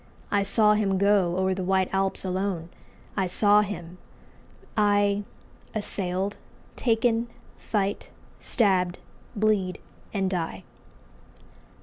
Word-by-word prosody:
I 205 - +3
saw 210 +2 +5
him 200 -3 +1
go 195 -3 +3
O'er 190 0 +1
the 185 0 -3
white 190 0 +2
Alps 195 0 0
alone; 185 -2 -2 0.5
I 190 -2 +1
saw 205 +3 +5
him, 180 -4 -6 0.8
I, 205 -1 +2 0.5
Assailed, 195 -1 -2 0.4
taken, 230 0 +1 0.3
fight, 200 -2 -2 0.3
stabbed, 185 -6 +1 0.4
bleed, 205 -3 +1 0.3
and 195 -2 0
die. 175 -3 -3
195 Hz, 100 wpm, -26 LUFS, 185-210 Hz, 0.8 s, saw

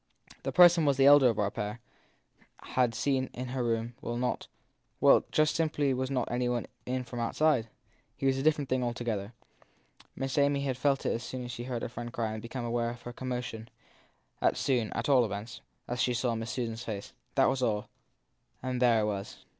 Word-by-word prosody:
The - - -3
person 175 -2 +7
the 135 -1 +4
elder 140 -2 +8
of 115 - -1
our 100 -1 +1
pair 105 +3 -4 0.8
had 125 -3 +1
seen 130 -1 0
in 125 0 -5
her 130 0 -2
room 115 0 -1
was 120 - -3
not 125 0 -2 0.5
well, - - +6
just 155 0 +3
simply 150 -4 +1
was 130 0 -2
not 130 -3 -1
any 125 0 0
one 120 -1 -1 0.2
in 130 0 -1
from 120 0 -7
outside. 120 0 +2 0.5
He - - -3
was 135 -1 +3
a - - -1
different 150 -1 +2
thing 130 -1 0
altogether. 120 -3 -3 0.8
Miss 135 +2 -1
Amy 140 0 +3
had 135 -2 -1
felt 135 +1 +1
it - - +2
as 115 - -3
soon 125 +1 -5
as 120 - -6
she 120 0 -6
heard 125 -2 -3
her - - -1
friend 120 0 -6
s - - -16
cry 115 -2 -1
and 110 - -5
become 120 +2 -5
aware 120 0 0
of 120 0 -9
her 120 - -7
commotion; 125 -3 -5 0.7
as - - +2
soon, 120 -6 0
at - - -2
all 135 -4 +5
events, 110 +1 -5 0.3
as 125 +1 -2
she 125 - +1
saw 125 -1 0
Miss 115 0 -4
Susan 115 -2 -2
s 115 +1 -7
face. 100 -3 -6 0.2
That - - +5
was 135 - +1
all 110 -4 0 0.8
and 130 -1 -2
there 120 -3 +5
it - - +1
was. 100 -2 -5
125 Hz, 210 wpm, -30 LUFS, 115-130 Hz, 0.8 s, elder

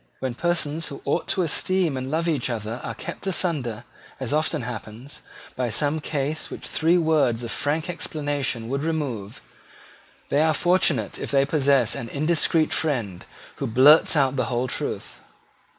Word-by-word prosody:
When 130 -2 -3
persons 165 +1 -1
who 140 - -9
ought 140 - -1
to 185 - +1
esteem 175 0 +1
and 130 0 -4
love 165 +3 -1
each 145 -7 0
other 115 0 -4
are 115 - -5
kept 170 - -7
asunder, 150 - -1 0.4
as - - -2
often 155 -2 0
happens, 120 +2 -7 0.3
by 125 -2 -1
some 145 +7 +1
cause 150 0 -3
which - - -8
three 165 +3 +2
words 150 -8 +2
of 115 - -4
frank 150 +2 -1
explanation 145 -8 -2
would 140 +3 -2
remove, 140 -11 -4 0.9
they 145 - +2
are 160 0 +3
fortunate 165 - +2
if - - -5
they 140 -1 +3
possess 140 -5 +3
an 115 - -4
indiscreet 155 +2 +2
friend 120 - -2 0.3
who - - -3
blurts 140 +8 +7
out 135 -2 +2
the - - +1
whole 125 0 -1
truth. - - -5
145 Hz, 160 wpm, -24 LUFS, 125-160 Hz, 0.9 s, blurts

